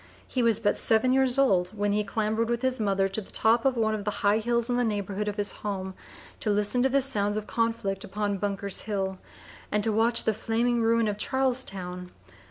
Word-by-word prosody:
He 255 - -1
was 230 -3 +3
but 205 -2 +1
seven 225 +3 +3
years 265 -1 +3
old 195 -7 +2
when 205 0 0
he 210 +1 +1
clambered 220 +2 -1
with 240 +1 -1
his 260 -1 0
mother 195 -2 +1
to 195 +3 -2
the 190 - -15
top 230 +2 +2
of 265 -2 +2
one 220 -1 +1
of 210 -1 -3
the 210 - -1 0.2
high 205 +2 +4
hills 235 +1 0
in 245 - 0
the 245 - +1
neighborhood 205 -2 -2
of 205 - -2
his 205 -1 -1
home 190 -2 -5 0.5
to 215 - -2
listen 210 +4 +2
to 265 - +3
the 275 +1 +2
sounds 205 -6 +1
of 215 - -4
conflict 225 -5 -2
upon 205 0 -3
Bunker's 200 -1 -2
Hill, 190 -3 -3 0.5
and 210 0 +1
to 220 - 0
watch 230 +2 +3
the 220 - +1
flaming 235 +2 0
ruin 230 0 +2
of 205 0 -3
Charlestown. 195 -10 -1
215 Hz, 215 wpm, -27 LUFS, 200-235 Hz, 0.5 s, high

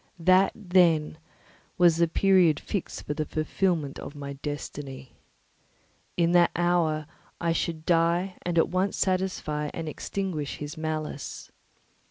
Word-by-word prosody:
_" - - -37 0.2
That, 185 +1 +5
then, 175 -6 +2 0.6
was 175 -2 +5
the 170 0 +3
period 180 -3 +4
fixed 200 - -4
for 150 - -2
the 155 - -2
fulfilment 155 -1 -1
of 145 - -8
my 140 -1 -6
destiny. 140 -2 -7 1.0
In 170 -1 +3
that 175 -1 +5
hour 170 -3 +1 0.3
I 170 -1 0
should 160 -1 -2
die 175 +2 +2
and 175 -1 -2
at 165 - +4
once 185 +2 0
satisfy 185 -6 -1
and 165 -1 -4
extinguish 155 -2 -4
his 145 0 -6
malice. 155 -2 -5
165 Hz, 135 wpm, -27 LUFS, 150-180 Hz, 1.0 s, That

